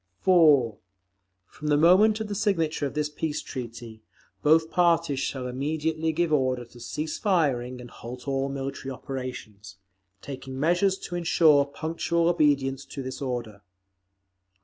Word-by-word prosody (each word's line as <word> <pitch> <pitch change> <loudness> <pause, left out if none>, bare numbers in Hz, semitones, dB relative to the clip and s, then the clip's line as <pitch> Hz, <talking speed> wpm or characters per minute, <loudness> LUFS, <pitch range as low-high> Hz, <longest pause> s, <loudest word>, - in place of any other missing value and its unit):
4. 150 - +4 0.7
From 150 +9 -9
the 145 -1 +3
moment 195 +7 +5
of 220 - -3
the 205 - -4
signature 165 -7 0
of 140 - -9
this 150 0 0
peace 150 0 -3
treaty, 115 -3 -8 0.4
both 160 +2 +3
parties 170 -5 +2
shall 135 -2 -3
immediately 155 +5 -1
give 165 0 0
order 130 -3 +1
to 120 +1 -16
cease 150 +6 -4
firing 130 - 0
and 120 -1 -11
halt 125 +3 -9
all 135 0 0
military 135 0 -5
operations, 125 -7 -7 0.4
taking 130 +1 -8
measures 175 +5 +2
to 175 - -8
ensure 160 -4 +4
punctual 165 +3 -1
obedience 140 -5 +1
to 135 0 -7
this 130 +1 -6
order. 120 -6 -4
145 Hz, 140 wpm, -26 LUFS, 130-165 Hz, 0.7 s, moment